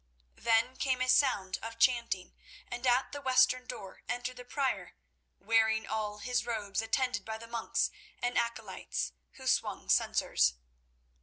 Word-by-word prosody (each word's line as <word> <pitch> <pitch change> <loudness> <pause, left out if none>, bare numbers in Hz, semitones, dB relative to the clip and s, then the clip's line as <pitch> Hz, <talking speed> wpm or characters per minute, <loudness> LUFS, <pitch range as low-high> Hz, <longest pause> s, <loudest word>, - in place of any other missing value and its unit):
Then 230 +3 +2
came 260 -2 +1
a 255 - +1
sound 205 -9 +3
of 230 0 -6
chanting, 235 -7 +2 0.3
and 245 +1 -3
at 250 +2 +3
the 285 - -6
western 255 -1 +4
door 195 -2 -8
entered 245 +1 -3
the 250 - -8
Prior, 270 +1 -2 0.4
wearing 220 +1 +3
all 210 0 -2
his 245 +3 -1
robes, 210 -3 -2
attended 225 -1 0
by 220 +1 -5
the 230 - -10
monks 230 0 -1 0.3
and 245 0 -1
acolytes, 215 - -2 0.2
who - - -12
swung 65 - 0
censers. - - +3
230 Hz, 145 wpm, -32 LUFS, 215-255 Hz, 0.4 s, western